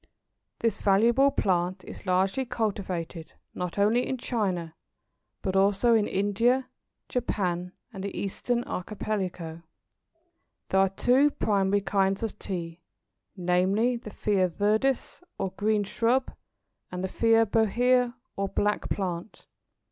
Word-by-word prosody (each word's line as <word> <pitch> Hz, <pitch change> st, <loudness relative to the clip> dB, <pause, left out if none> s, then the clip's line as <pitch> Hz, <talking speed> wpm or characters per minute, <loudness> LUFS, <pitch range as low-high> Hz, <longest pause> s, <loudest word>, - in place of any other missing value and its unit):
This 230 Hz, -1 st, 0 dB
valuable 235 Hz, +7 st, +4 dB
plant 185 Hz, -5 st, 0 dB
is -, -, -10 dB
largely 190 Hz, +7 st, +2 dB
cultivated 190 Hz, -9 st, -3 dB, 0.2 s
not 180 Hz, 0 st, -4 dB
only 220 Hz, +5 st, +3 dB
in 260 Hz, -, -2 dB
China 185 Hz, -10 st, -2 dB, 0.7 s
but 190 Hz, -2 st, -1 dB
also 200 Hz, +4 st, +4 dB
in 215 Hz, -2 st, +3 dB
India, 230 Hz, +7 st, +1 dB, 0.4 s
Japan, 180 Hz, -7 st, -2 dB, 0.2 s
and 195 Hz, -2 st, -6 dB
the 200 Hz, -, -5 dB
Eastern 240 Hz, +5 st, -1 dB
Archipelago. 180 Hz, -5 st, -4 dB, 1.1 s
There 190 Hz, -, +3 dB
are 195 Hz, 0 st, +4 dB
two 250 Hz, +9 st, +3 dB
primary 200 Hz, -6 st, +1 dB
kinds 195 Hz, 0 st, +1 dB
of 225 Hz, -, -4 dB
Tea, 170 Hz, -2 st, -5 dB, 0.6 s
namely 190 Hz, +7 st, +2 dB
the 235 Hz, -2 st, -7 dB
Thea 195 Hz, -3 st, +1 dB
viridis, 215 Hz, -, 0 dB, 0.2 s
or 190 Hz, -, -2 dB
green 210 Hz, +1 st, +1 dB
shrub, 240 Hz, +6 st, 0 dB, 0.6 s
and 180 Hz, 0 st, -4 dB
the -, -, 0 dB
Thea 225 Hz, +3 st, +3 dB
Bohea, 240 Hz, +3 st, +2 dB, 0.2 s
or 195 Hz, 0 st, -1 dB
black 205 Hz, +1 st, 0 dB
plant. 180 Hz, 0 st, -4 dB
200 Hz, 120 wpm, -27 LUFS, 185-230 Hz, 1.1 s, valuable